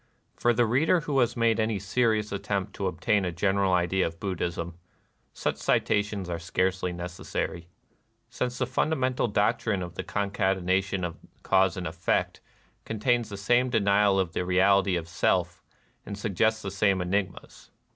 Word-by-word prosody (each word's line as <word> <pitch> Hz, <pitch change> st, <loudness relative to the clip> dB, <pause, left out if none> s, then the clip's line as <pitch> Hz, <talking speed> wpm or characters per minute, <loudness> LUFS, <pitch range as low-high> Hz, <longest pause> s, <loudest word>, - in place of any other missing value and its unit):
For 120 Hz, -, +2 dB
the 120 Hz, +1 st, +3 dB
reader 150 Hz, +10 st, +2 dB
who 145 Hz, -3 st, 0 dB
has 120 Hz, -1 st, +1 dB
made 115 Hz, -1 st, +2 dB
any 110 Hz, -1 st, +1 dB
serious 105 Hz, +1 st, 0 dB
attempt 100 Hz, -1 st, -3 dB
to 100 Hz, -, -2 dB
obtain 95 Hz, +4 st, +1 dB
a 90 Hz, -, -1 dB
general 95 Hz, +2 st, +1 dB
idea 90 Hz, +1 st, +2 dB
of 80 Hz, 0 st, -9 dB
Buddhism, 85 Hz, -3 st, -3 dB, 0.5 s
such -, -, -2 dB
citations 105 Hz, -2 st, 0 dB
are 85 Hz, -1 st, -3 dB
scarcely 90 Hz, +2 st, -1 dB
necessary; 85 Hz, -1 st, -5 dB, 0.6 s
since 125 Hz, +1 st, -3 dB
the 130 Hz, -, 0 dB
fundamental 130 Hz, -1 st, 0 dB
doctrine 105 Hz, -2 st, 0 dB
of 90 Hz, -1 st, -7 dB
the -, -, -5 dB
concatenation 95 Hz, -1 st, 0 dB
of 85 Hz, -1 st, -6 dB, 0.2 s
cause 95 Hz, -2 st, +3 dB
and 90 Hz, -, -4 dB
effect 90 Hz, +2 st, -1 dB, 0.4 s
contains 115 Hz, +1 st, 0 dB
the 100 Hz, -, -6 dB
same 120 Hz, +6 st, +2 dB
denial 100 Hz, -3 st, +3 dB
of 90 Hz, -3 st, -1 dB
the -, -, -1 dB
reality 95 Hz, +1 st, +3 dB
of 85 Hz, -2 st, -3 dB
Self 85 Hz, -, 0 dB, 0.4 s
and 100 Hz, -, -7 dB
suggests 110 Hz, +2 st, 0 dB
the 95 Hz, -, -4 dB
same 100 Hz, -1 st, +2 dB
enigmas. 95 Hz, +2 st, -3 dB
100 Hz, 155 wpm, -27 LUFS, 90-110 Hz, 0.6 s, the